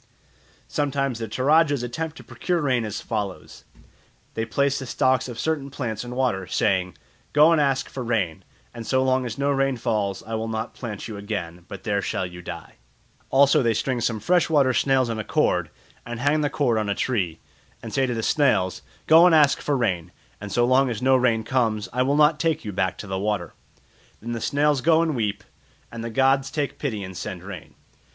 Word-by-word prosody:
Sometimes 140 -4 -1
the 115 - -4
Toradjas 145 +4 +2
attempt 155 +6 -4
to - - -11
procure 175 -1 -2
rain 130 -6 +1
as 105 - -4
follows. 105 -5 -5 0.7
They 115 - -2
place 140 +4 0
the 135 - -7
stalks 130 +1 +1
of 120 - -7
certain 155 -3 -1
plants 125 -6 -4
in 125 0 -7
water, 120 -8 0
saying, 90 -4 0 0.4
"Go 150 +3 +6
and 165 -2 +4
ask 135 -2 +1
for 130 - -6
rain, 110 -9 -1 0.3
and 115 -1 -8
so 130 0 +2
long 130 -1 +1
as 115 - -6
no 140 +1 +1
rain 135 -1 +1
falls 105 -5 -1
I 115 - -8
will 110 0 -2
not 110 0 -4
plant 110 -5 -6
you 110 -3 -7
again, 90 -5 -5
but 95 -2 -9
there 100 -2 0
shall 95 - -2
you 90 0 -9
die." - - -9 0.5
Also 140 +1 +5
they 115 -3 +1
string 125 +2 -1
some 115 -1 0
fresh 175 +7 +2
water 140 -5 +3
snails 130 -1 +2
on 115 -1 -3
a - - -2
cord, - - +1 0.3
and 120 -1 -6
hang 145 +4 +2
the 145 - +1
cord 125 -6 +1
on 105 -1 -2
a 100 - 0
tree, 95 -11 -1 0.5
and 115 - -7
say 135 -1 +2
to 125 - -2
the 115 - -3
snails, 95 -12 +2 0.2
"Go 165 +3 +7
and 170 - +5
ask 150 -2 +4
for 145 -2 0
rain, 90 -8 -1 0.3
and 105 -1 -7
so 120 +3 +3
long 130 +1 +3
as 115 0 -4
no 130 0 +5
rain 120 -3 +2
comes, 110 -4 0
I 125 - +1
will 140 +3 +2
not 150 0 +4
take 160 -3 0
you 105 - -3
back 95 -1 -1
to - - -7
the 95 -1 -3
water." 100 -5 -2 0.7
Then 115 +2 -6
the 115 -1 -3
snails 145 -1 +1
go 165 +2 +4
and 160 -3 -1
weep, 105 -4 -2 0.5
and 115 -1 -6
the 115 - -4
gods 135 +3 +2
take 145 -1 -3
pity 110 -9 -3
and 95 0 -8
send 90 0 -6
rain. 95 -4 -9
120 Hz, 210 wpm, -24 LUFS, 105-140 Hz, 0.7 s, Go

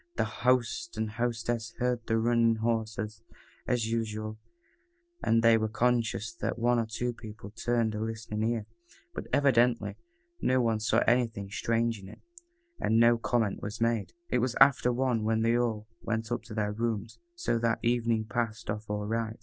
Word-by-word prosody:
The 115 - +1
host 125 +8 0
and 110 0 -1
hostess 115 0 -2
heard 125 -1 +1
the 115 - +2
running 115 0 +3
horses, 110 -1 -2 0.5
as 120 -3 +1
usual, 110 -1 -3 0.8
and 115 0 +3
they 115 -1 +6
were 110 - 0
conscious 115 -2 0
that - - -2
one 120 +1 +2
or 115 - -1
two 120 +2 -2
people 110 -3 -10
turned 115 0 0
a 105 - -3
listening 110 -1 -4
ear, 115 -3 -2 0.5
but - - -6
evidently 125 -4 +3 0.4
no 130 0 +3
one 115 -3 +1
saw 110 +2 +2
anything 115 -5 +1
strange 115 +1 0
in 95 0 -11
it, - - -13 0.6
and 110 +1 +2
no 115 0 +5
comment 115 -3 0
was 105 +2 -5
made. 115 -3 0 0.2
It 125 - +2
was 125 0 0
after 135 -2 +6
one 120 -2 0
when 110 +1 +1
they 115 +1 +3
all 115 -3 0
went 115 0 -2
up 120 - -1
to 110 - -8
their 105 -1 0
rooms, 110 0 -3 0.2
so 235 - 0
that 115 0 +1
evening 115 -2 +1
passed 115 -2 -2
off 105 0 -6
all 105 0 -2
right. 110 0 -2
115 Hz, 175 wpm, -29 LUFS, 110-120 Hz, 0.8 s, they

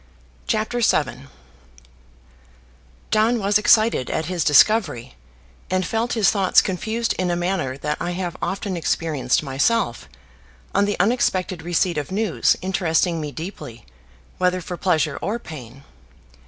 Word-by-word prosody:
CHAPTER 220 +3 -1
VII 140 - 0 1.8
John 220 +3 +3
was 205 -1 +2
excited 215 - +3
at 160 - -2
his 180 -3 -1
discovery, 150 - +3 0.6
and 185 0 0
felt 225 +2 -1
his 220 -4 +3
thoughts 195 -3 +4
confused 220 +5 -1
in 185 -1 0
a 175 - +1
manner 175 -7 -2
that 150 +1 -3
I 175 0 -2
have 180 -1 -4
often 195 0 -3
experienced 155 -5 0
myself 140 - 0 0.6
on 200 - +3
the 205 0 -2
unexpected 185 -4 +1
receipt 175 -1 0
of 145 - -6
news 210 -1 +1
interesting 175 -2 0
me 150 -1 -5
deeply, 150 - -8 0.5
whether 180 0 +2
for 180 0 -6
pleasure 170 -5 0
or 205 +6 -2
pain. 135 - -11
180 Hz, 130 wpm, -22 LUFS, 155-205 Hz, 1.8 s, thoughts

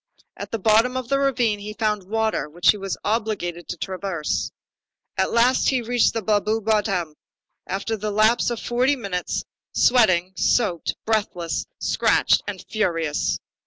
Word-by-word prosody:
At - - -7
the 225 - -2
bottom 225 +5 +3
of 255 -2 -5
the 275 - +2
ravine 245 -6 +1
he 210 +1 -7
found 210 -4 -1
water 220 -9 0
which 175 +3 +4
he 210 - -5
was 195 -1 -4
obliged 205 -6 -2
to 175 - -4
traverse. 185 -3 -3 0.7
At - - 0
last 245 +2 +3
he 260 -3 0
reached 240 +1 +2
the 225 - -2
Blaru 215 +1 +1
bottom, 200 -7 0 0.5
after 200 +4 -2
the 215 0 -4
lapse 215 +4 +3
of 240 -2 -3
forty 250 +4 +1
minutes, 200 -8 -3 0.3
sweating, 185 -7 +4
soaked, 185 -6 +1
breathless, 200 -6 -1
scratched, - - +2
and - - -6
ferocious. 165 -8 0
215 Hz, 150 wpm, -23 LUFS, 185-230 Hz, 0.7 s, which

